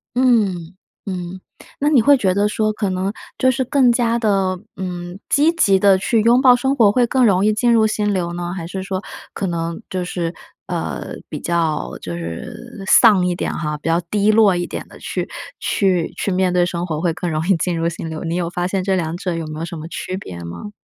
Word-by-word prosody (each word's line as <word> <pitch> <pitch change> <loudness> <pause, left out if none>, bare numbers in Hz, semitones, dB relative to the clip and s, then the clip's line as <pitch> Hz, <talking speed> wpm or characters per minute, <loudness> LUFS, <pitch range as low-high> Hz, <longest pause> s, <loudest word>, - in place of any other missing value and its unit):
嗯， 200 -9 +2 0.3
嗯， 185 -1 -5 0.4
那 290 - +1
你 285 -6 +5
会 285 +4 +5
觉 190 -7 +1
得 200 +2 +2
说 215 0 0
可 210 -2 -2
能 185 +2 -2 0.2
就 260 - +3
是 260 +1 +1
更 260 0 +3
加 235 -1 +1
地， 225 - 0 0.5
嗯， 175 -1 -6
积 305 +4 +4
极 195 - +3
地 195 -1 +5
去 220 +4 +1
拥 235 +3 +4
抱 255 -2 +7
生 265 +2 +1
活 225 -6 +5
会 245 +2 +2
更 255 +1 +3
容 195 -2 +3
易 215 - +3
进 235 +3 +2
入 220 -1 +4
心 210 -1 0
流 175 -2 -2
呢？ 175 0 -4
还 170 -3 -5
是 190 +2 -5
说 190 -1 -3 0.3
可 195 - -3
能 170 +1 -3
就 185 -1 -2
是， 175 -1 -3 0.3
呃， - - -4 0.2
比 - - -5
较 170 -2 -1
就 85 - -5
是 85 - -7
丧 195 -5 +6
一 180 - +1
点 175 - -3
哈， 150 -2 -3
比 150 - -8
较 165 +1 +2
低 210 +1 +3
落 215 -3 +5
一 175 0 -2
点 - - -6
地 - - -14
去 - - -4 0.3
去 185 -4 +1
去 - - -1
面 185 -1 +1
对 180 0 +3
生 175 -1 -3
活 155 -3 -3
会 170 -1 0
更 175 +1 -3
容 155 +2 -2
易 195 - +4
进 170 +1 -1
入 165 - +1
心 165 -1 -4
流？ 160 -1 -5
你 165 +1 -2
有 175 -1 -1
发 175 0 -2
现 190 0 -1
这 190 0 +1
两 165 -2 -2
者 180 0 -3
有 165 -1 -4
没 155 0 -6
有 165 - -3
什 170 0 -7
么 155 - -7
区 185 +2 -5
别 90 - -8
吗？ 85 - -8
185 Hz, 245 characters per minute, -19 LUFS, 170-215 Hz, 0.5 s, 抱